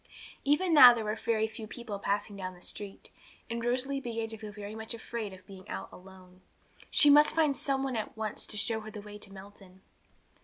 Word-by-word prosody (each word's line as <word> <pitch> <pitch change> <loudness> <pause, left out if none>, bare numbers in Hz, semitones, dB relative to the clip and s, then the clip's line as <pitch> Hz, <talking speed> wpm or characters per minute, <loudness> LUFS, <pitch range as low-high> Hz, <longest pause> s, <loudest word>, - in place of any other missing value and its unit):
Even 325 +5 +2
now 250 -5 +10
there 225 - -3
were 210 0 -1
very 220 0 0
few 220 0 -7
people 225 -3 -7
passing 205 +1 -1
down 185 -2 -6
the - - -16
street, 200 +1 -8 0.4
and 235 0 -3
Rosalie 255 +3 0
began 230 -3 -3
to 220 - -6
feel 215 -1 -7
very 205 0 -8
much 220 +1 -4
afraid 225 -2 -5
of 190 0 -13
being 190 -2 -13
out 95 0 -5
alone. 185 0 -15 0.5
She 290 - +6
must 295 +1 +6
find 310 -4 +3
some 270 -1 0
one 265 -2 -2
at 220 0 -4
once 215 -1 -3
to 210 - -3
show 220 +2 +1
her 215 0 -9
the 210 -1 -8
way 210 0 -10
to 205 -1 -8
Melton. 195 -1 -13
220 Hz, 215 wpm, -30 LUFS, 200-240 Hz, 0.5 s, now